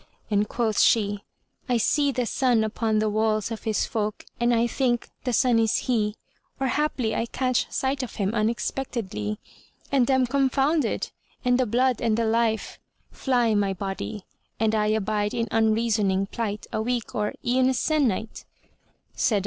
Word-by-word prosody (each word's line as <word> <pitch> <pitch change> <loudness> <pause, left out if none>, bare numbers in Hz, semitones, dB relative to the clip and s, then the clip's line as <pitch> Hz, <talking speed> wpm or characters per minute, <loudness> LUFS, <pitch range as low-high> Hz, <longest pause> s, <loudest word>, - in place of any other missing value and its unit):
and 205 0 +2
quoth 225 -3 0
she, 205 -2 +3 0.5
"I 245 - +3
see 285 +5 +2
the 250 -2 -1
sun 240 -1 +2
upon 220 0 0
the 215 0 +2
walls 215 0 0
of 225 - -6
his 220 -2 +1
folk 215 -1 -3
and 240 0 +2
I 235 0 +3
think 240 0 0 0.2
the 250 - +1
sun 240 0 +3
is 225 -2 +2
he; 215 -4 0 0.4
or 270 -1 0
haply 260 -6 0
I 230 - -1
catch 255 0 0
sight 270 +1 -1
of 255 - -6
him 200 0 -1
unexpectedly 215 - -2 0.5
and 265 -3 +3
am 260 -1 +4
confounded 275 +2 +1 0.3
and 250 0 +3
the 255 - +2
blood 250 +2 +1
and 225 -2 +1
the 230 - +1
life 225 0 0 0.3
fly 245 -4 +1
my 200 -2 +1
body 195 +1 -5 0.4
and 220 0 +2
I 210 -1 +2
abide 215 +1 0
in 230 -1 0
unreasoning 220 -3 +2
plight 210 0 -4
a 220 - 0
week 240 0 -2
or 210 -1 -1
e'en 255 +1 +3
a - - +2
se'nnight." 245 -8 0
230 Hz, 160 wpm, -25 LUFS, 215-250 Hz, 0.5 s, am